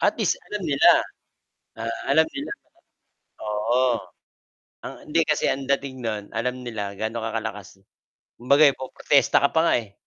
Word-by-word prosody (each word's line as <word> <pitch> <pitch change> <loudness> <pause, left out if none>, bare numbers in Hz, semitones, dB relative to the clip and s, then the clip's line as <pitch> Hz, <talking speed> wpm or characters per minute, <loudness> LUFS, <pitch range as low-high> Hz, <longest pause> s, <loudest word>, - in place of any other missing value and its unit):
Atleast - - +1
alam 210 -3 -5
nila, 140 -4 +5 0.9
ah, 115 0 -3
alam 160 +2 +4
nila. 290 +6 -5 0.9
Oo. 110 +4 +1 1.0
Ah, - - -8
hindi 160 +2 +2
kasi 150 -1 0
ang 135 - -1
dating 135 -2 -2
no'n 105 -2 -3
alam 125 +3 -2
nila 110 -5 -5
gaano 110 +1 -3
ka 115 - -3
kalakas, 105 -3 -8 0.6
kumbaga 140 +5 +4
po-protesta 130 +2 +2
ka 140 - +3
pa 160 - +4
nga 170 - +3
eh. 105 -4 -8
125 Hz, 145 wpm, -24 LUFS, 110-140 Hz, 1.0 s, nila